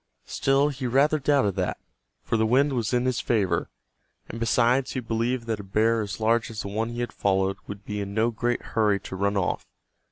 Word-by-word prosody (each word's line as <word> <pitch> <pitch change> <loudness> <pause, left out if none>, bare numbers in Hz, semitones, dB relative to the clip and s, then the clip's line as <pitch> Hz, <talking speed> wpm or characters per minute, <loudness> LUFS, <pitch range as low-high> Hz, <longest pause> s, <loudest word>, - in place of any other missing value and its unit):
Still 135 +2 +2
he 135 -2 -4
rather 140 +5 +3
doubted 135 -8 +2
that, 90 -1 -1 0.5
for - - -1
the 110 0 +2
wind 135 +5 +3
was 115 -4 -1
in 125 0 +1
his 130 -1 0
favor, 95 -7 0 0.6
and 115 - -7
besides 125 +3 +2
he 130 - -2
believed 115 +1 -1
that 110 -2 -2
a - - -6
bear 110 +4 +2
as 105 0 -5
large 115 +1 +2
as 110 -2 -5
the 100 - -5
one 110 +3 -2
he 120 +1 -4
had 120 - -4
followed 95 0 +1
would 100 0 -8
be 105 0 -3
in 100 0 -5
no 115 +2 +2
great 120 +2 -1
hurry 105 -3 +3
to - - -7
run 100 +1 0
off. 90 - -1
115 Hz, 215 wpm, -26 LUFS, 100-125 Hz, 0.6 s, rather